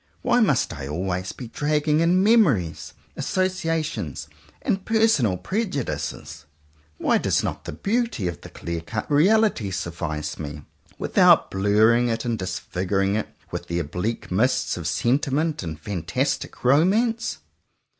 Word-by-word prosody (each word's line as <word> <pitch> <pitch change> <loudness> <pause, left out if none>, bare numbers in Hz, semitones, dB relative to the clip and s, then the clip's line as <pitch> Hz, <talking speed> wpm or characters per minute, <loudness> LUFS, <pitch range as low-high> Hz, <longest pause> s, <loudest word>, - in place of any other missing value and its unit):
Why 245 -1 +3
must 220 - +2
I 70 -1 -6
always 90 +4 -2
be 125 - -8
dragging 150 +4 +1
in 175 +3 +3
mem 225 +1 +6
ories, 90 - -2 0.2
associations, 165 - -2 0.3
and 195 0 0
personal 220 - +2
prejudices? 120 - -3 0.5
Why - - +2
does - - +1
not - - -4
the - - -4
beauty 225 - -1
of 85 - -5
the - - -10
clear 85 -1 -5
cut 105 - -5
reality 190 - +3
suffice 85 -5 -4
me, 75 -1 -6 0.3
without - - +4
blurring 110 +5 +3
it 115 0 -2
and 115 -2 -1
disfiguring 95 +2 -1
it 110 - -1 0.2
with - - -5
the 85 - -2
oblique 90 +9 -3
mists 115 +8 +1
of 85 -3 -4
sentiment 140 - 0
and 80 -4 -6
fantastic 85 -3 -3
romance? 195 - +2
115 Hz, 135 wpm, -24 LUFS, -, 0.5 s, mem